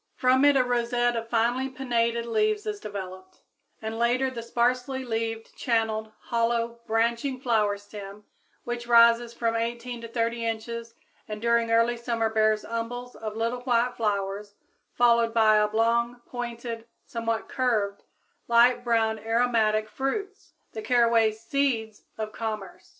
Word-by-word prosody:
From 255 Hz, +1 st, +3 dB
it 285 Hz, -1 st, +6 dB
a 255 Hz, -, +4 dB
rosette 240 Hz, 0 st, +1 dB
of 230 Hz, 0 st, -4 dB
finely 240 Hz, +3 st, +1 dB
pinnated 235 Hz, -3 st, -1 dB
leaves 425 Hz, -, 0 dB
is 420 Hz, -1 st, -3 dB
developed, 185 Hz, -, -8 dB, 0.4 s
and 220 Hz, +1 st, -4 dB
later 250 Hz, +3 st, +2 dB
the 235 Hz, -2 st, -6 dB
sparsely 250 Hz, +3 st, 0 dB
leaved, 225 Hz, -1 st, -3 dB
channeled, 220 Hz, -3 st, -1 dB
hollow, 235 Hz, 0 st, -1 dB
branching 235 Hz, +4 st, 0 dB
flower 220 Hz, -5 st, +1 dB
stem 205 Hz, 0 st, -10 dB, 0.4 s
which 240 Hz, 0 st, -5 dB
rises 235 Hz, 0 st, +5 dB
from 230 Hz, -1 st, -1 dB
18 235 Hz, +1 st, -3 dB
to 230 Hz, -, -7 dB
30 230 Hz, 0 st, -1 dB
inches 230 Hz, +1 st, -4 dB, 0.3 s
and 215 Hz, 0 st, -5 dB
during 235 Hz, 0 st, +2 dB
early 230 Hz, +1 st, +3 dB
summer 230 Hz, -2 st, -1 dB
bears 215 Hz, -1 st, +2 dB
umbels 245 Hz, +2 st, -5 dB
of 215 Hz, -1 st, -6 dB
little 230 Hz, +2 st, -1 dB
white 245 Hz, -1 st, +1 dB
flowers 205 Hz, -1 st, -2 dB, 0.4 s
followed 235 Hz, -1 st, +3 dB
by 215 Hz, -2 st, +5 dB
oblong, 230 Hz, +3 st, +1 dB
pointed, 235 Hz, -1 st, -6 dB, 0.2 s
somewhat 230 Hz, -1 st, -3 dB
curved, 215 Hz, -6 st, 0 dB, 0.5 s
light 240 Hz, +1 st, +4 dB
brown 225 Hz, -2 st, +1 dB
aromatic 225 Hz, -1 st, +1 dB
fruits 390 Hz, -, -4 dB, 0.2 s
the 435 Hz, -, -5 dB
caraway 235 Hz, -, +3 dB
"seeds" 225 Hz, -1 st, -2 dB
of 215 Hz, -1 st, -4 dB
commerce. 215 Hz, -5 st, -6 dB
230 Hz, 135 wpm, -26 LUFS, 220-245 Hz, 0.5 s, it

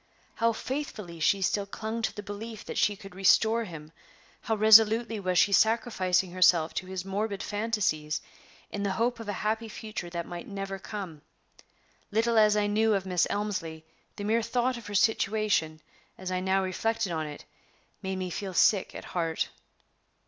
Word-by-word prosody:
How 230 Hz, 0 st, +2 dB
faithfully 220 Hz, -, -5 dB
she 195 Hz, +4 st, +2 dB
still 200 Hz, +2 st, 0 dB
clung 220 Hz, +3 st, -4 dB
to -, -, 0 dB
the 205 Hz, -, -6 dB
belief 215 Hz, +2 st, -7 dB
that -, -, -3 dB
she 205 Hz, -, +3 dB
could 195 Hz, -1 st, -12 dB
restore 220 Hz, +4 st, +3 dB
him! 155 Hz, -4 st, -10 dB, 0.5 s
How 225 Hz, -, -1 dB
resolutely 220 Hz, +1 st, +6 dB
was 185 Hz, -2 st, -1 dB
she 200 Hz, -, +5 dB
sacrificing 190 Hz, -5 st, +2 dB
herself 175 Hz, -3 st, +4 dB
to 185 Hz, -, -4 dB
his 185 Hz, -1 st, -5 dB
morbid 200 Hz, +1 st, -2 dB
fancies, 205 Hz, -9 st, -1 dB, 0.5 s
in 205 Hz, -, -4 dB
the 200 Hz, -1 st, 0 dB
hope 235 Hz, +4 st, 0 dB
of 225 Hz, -2 st, -7 dB
a -, -, -1 dB
happy 220 Hz, +1 st, -1 dB
future 215 Hz, -5 st, -6 dB
that 170 Hz, -1 st, -4 dB
might 175 Hz, -1 st, -7 dB
never 195 Hz, -1 st, -5 dB
come! 185 Hz, -7 st, -7 dB, 0.9 s
Little 225 Hz, +2 st, +2 dB
as 210 Hz, -1 st, +5 dB
I 210 Hz, -, +2 dB
knew 215 Hz, +1 st, +2 dB
of 195 Hz, -1 st, -2 dB
Miss 180 Hz, -2 st, +1 dB
Elmslie, 165 Hz, -6 st, -3 dB, 0.3 s
the 205 Hz, -, -6 dB
mere 225 Hz, +3 st, +2 dB
thought 245 Hz, +3 st, 0 dB
of 235 Hz, -3 st, -9 dB
her 205 Hz, -, -5 dB
situation, 200 Hz, -7 st, +1 dB, 0.4 s
as 185 Hz, 0 st, -5 dB
I 185 Hz, -, 0 dB
now 190 Hz, +1 st, +1 dB
reflected 225 Hz, +2 st, -1 dB
on 160 Hz, -2 st, -2 dB
it, 145 Hz, -1 st, -9 dB, 0.6 s
made 190 Hz, 0 st, -3 dB
me 185 Hz, -1 st, -4 dB
feel 190 Hz, 0 st, -5 dB
sick 200 Hz, +1 st, +3 dB
at -, -, -7 dB
heart. 165 Hz, -2 st, -2 dB
205 Hz, 175 wpm, -28 LUFS, 185-220 Hz, 0.9 s, resolutely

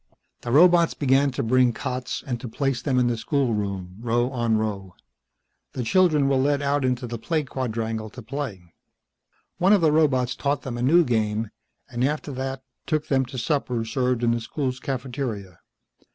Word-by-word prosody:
The 120 Hz, -, -4 dB
robots 170 Hz, +3 st, +5 dB
began 140 Hz, 0 st, +3 dB
to -, -, -2 dB
bring 125 Hz, +1 st, +3 dB
cots 125 Hz, 0 st, -4 dB
and 120 Hz, -3 st, -3 dB
to -, -, -5 dB
place 135 Hz, +1 st, -1 dB
them 130 Hz, -1 st, 0 dB
in 125 Hz, -, +3 dB
the 120 Hz, -1 st, +1 dB
schoolroom, 105 Hz, -, -2 dB
row 120 Hz, +2 st, 0 dB
on 120 Hz, -3 st, +1 dB
row. 100 Hz, -4 st, -3 dB, 0.8 s
The 125 Hz, -, -3 dB
children 155 Hz, +1 st, +3 dB
were 135 Hz, -1 st, +2 dB
led 140 Hz, +2 st, +2 dB
out 140 Hz, 0 st, +1 dB
into 125 Hz, -1 st, 0 dB
the 120 Hz, -1 st, -5 dB
play 155 Hz, +5 st, -1 dB
quadrangle 115 Hz, -4 st, -3 dB
to 125 Hz, +3 st, -11 dB
play. 110 Hz, -, -6 dB, 0.9 s
One 190 Hz, +3 st, +5 dB
of 200 Hz, -, +4 dB
the 160 Hz, -2 st, +4 dB
robots 130 Hz, -5 st, +2 dB
taught 140 Hz, -1 st, -1 dB
them 120 Hz, -2 st, -5 dB
a -, -, -3 dB
new 165 Hz, +8 st, +5 dB
game, 110 Hz, -4 st, -1 dB, 0.4 s
and 125 Hz, -2 st, -3 dB
after 150 Hz, +2 st, -1 dB
that 130 Hz, 0 st, -4 dB, 0.2 s
took 155 Hz, -2 st, -1 dB
them 135 Hz, -1 st, +2 dB
to 130 Hz, -, -8 dB
supper 125 Hz, -3 st, -1 dB
served 125 Hz, +1 st, 0 dB
in 120 Hz, -, +3 dB
the 120 Hz, 0 st, 0 dB
school's 130 Hz, +1 st, -3 dB
cafeteria. 125 Hz, -, -4 dB
125 Hz, 180 wpm, -24 LUFS, 115-140 Hz, 0.9 s, robots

